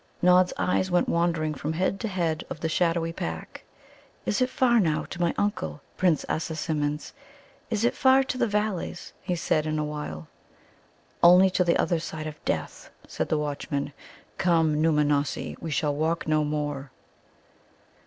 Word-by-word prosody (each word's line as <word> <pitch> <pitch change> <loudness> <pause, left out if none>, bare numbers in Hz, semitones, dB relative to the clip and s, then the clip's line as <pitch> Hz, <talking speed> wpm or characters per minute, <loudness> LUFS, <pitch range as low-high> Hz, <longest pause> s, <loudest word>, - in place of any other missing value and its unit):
Nod's 180 0 +5
eyes 185 +1 +1
went 175 0 +2
wandering 165 -2 +1
from 150 +2 -3
head 185 +4 0
to 225 - -2
head 170 -5 -1
of 155 - -7
the 160 - 0
shadowy 165 0 +1
pack. 80 - -6 0.6
"Is 210 - 0
it 255 - +3
far 240 -2 +3
now 160 -6 +1
to 175 - -7
my 170 -1 +3
uncle, 80 - -1 0.2
Prince 175 -5 +2
Assasimmon's? 155 -2 -2 0.6
Is 220 0 0
it 240 - +2
far 265 0 +5
to 265 - -3
the - - +3
Valleys?" 210 -4 -2
he 180 - -2
said 155 -2 0
in 155 0 -1
a 150 - 0
while. 150 - -6 0.9
"Only 180 +2 +7
to 180 - +2
the 170 -1 +2
other 170 -2 +1
side 160 -1 -6
of 155 -1 -8
death," - - -3 0.2
said - - -3
the 155 - +2
watchman. 145 -1 -3 0.5
"Come 165 -4 +3
Nōōmanossi, 150 -2 +1
we 165 - -4
shall 150 -1 0
walk 160 +3 -1
no 155 0 +2
more." 145 -2 -3
160 Hz, 165 wpm, -26 LUFS, 150-180 Hz, 0.9 s, Only